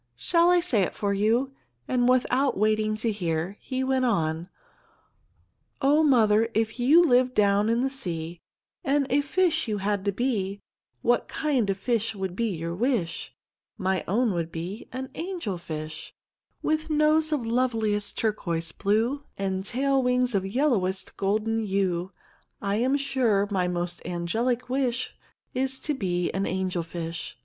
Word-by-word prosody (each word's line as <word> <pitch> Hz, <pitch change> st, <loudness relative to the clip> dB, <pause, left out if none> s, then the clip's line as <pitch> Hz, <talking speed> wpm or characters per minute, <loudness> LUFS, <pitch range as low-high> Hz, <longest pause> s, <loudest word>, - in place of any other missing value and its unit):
"Shall 335 Hz, -, +3 dB
I 355 Hz, 0 st, +5 dB
say 270 Hz, -, +2 dB
it 185 Hz, -, -1 dB
for 200 Hz, -1 st, 0 dB
you?" 225 Hz, +7 st, +1 dB, 0.4 s
and 245 Hz, -1 st, +2 dB
without 255 Hz, +1 st, +2 dB
waiting 215 Hz, +1 st, +1 dB
to 225 Hz, +1 st, 0 dB
hear, 175 Hz, -2 st, -2 dB
he 260 Hz, 0 st, -3 dB
went 260 Hz, 0 st, +1 dB
on: 165 Hz, -6 st, 0 dB, 1.3 s
"Oh, 290 Hz, +3 st, +4 dB
mother, 225 Hz, -6 st, +4 dB
if 220 Hz, +2 st, 0 dB
you 295 Hz, +8 st, +6 dB
lived 255 Hz, -4 st, +3 dB
down 205 Hz, +1 st, +3 dB
in 230 Hz, +1 st, +2 dB
the 265 Hz, -, +2 dB
sea 170 Hz, -9 st, -4 dB, 0.4 s
And 280 Hz, +1 st, +2 dB
a 285 Hz, +2 st, +4 dB
fish 325 Hz, 0 st, +1 dB
you 210 Hz, -2 st, -1 dB
had 200 Hz, 0 st, -1 dB
to 200 Hz, -, +2 dB
be, 200 Hz, -3 st, -1 dB, 0.4 s
What 240 Hz, -1 st, +2 dB
kind 265 Hz, -9 st, 0 dB
of 195 Hz, -, 0 dB
fish 230 Hz, +1 st, -1 dB
would 190 Hz, -2 st, -4 dB
be 230 Hz, +3 st, 0 dB
your 170 Hz, -2 st, -3 dB
wish? 200 Hz, -5 st, -1 dB, 0.4 s
My 190 Hz, 0 st, 0 dB
own 225 Hz, +3 st, +2 dB
would 165 Hz, -1 st, -2 dB
be 175 Hz, +7 st, -6 dB
an 260 Hz, +1 st, -5 dB
angel 335 Hz, -, -4 dB
fish. 155 Hz, -2 st, -7 dB, 0.5 s
"With 310 Hz, +1 st, 0 dB
nose 310 Hz, +1 st, +3 dB
of 285 Hz, -6 st, 0 dB
loveliest 225 Hz, -4 st, 0 dB
turquoise 170 Hz, -7 st, -1 dB
blue, 225 Hz, +8 st, 0 dB
And 190 Hz, -1 st, -2 dB
tail 270 Hz, +5 st, +1 dB
wings 250 Hz, -1 st, +1 dB
of 195 Hz, -2 st, +1 dB
yellowest 195 Hz, -6 st, 0 dB
golden 215 Hz, +3 st, 0 dB
hue 190 Hz, -3 st, -1 dB, 0.5 s
I'm 230 Hz, +8 st, +1 dB
sure 240 Hz, -8 st, +1 dB
my 185 Hz, -2 st, +1 dB
most 175 Hz, 0 st, -3 dB
angelic 225 Hz, +9 st, -1 dB
wish 255 Hz, -1 st, -1 dB, 0.4 s
Is 265 Hz, +1 st, -1 dB
to 300 Hz, -, -1 dB
be 180 Hz, -8 st, -1 dB
an 195 Hz, +1 st, -1 dB
angel 185 Hz, -2 st, -1 dB
fish. 165 Hz, -4 st, -6 dB
220 Hz, 155 wpm, -26 LUFS, 190-260 Hz, 1.3 s, you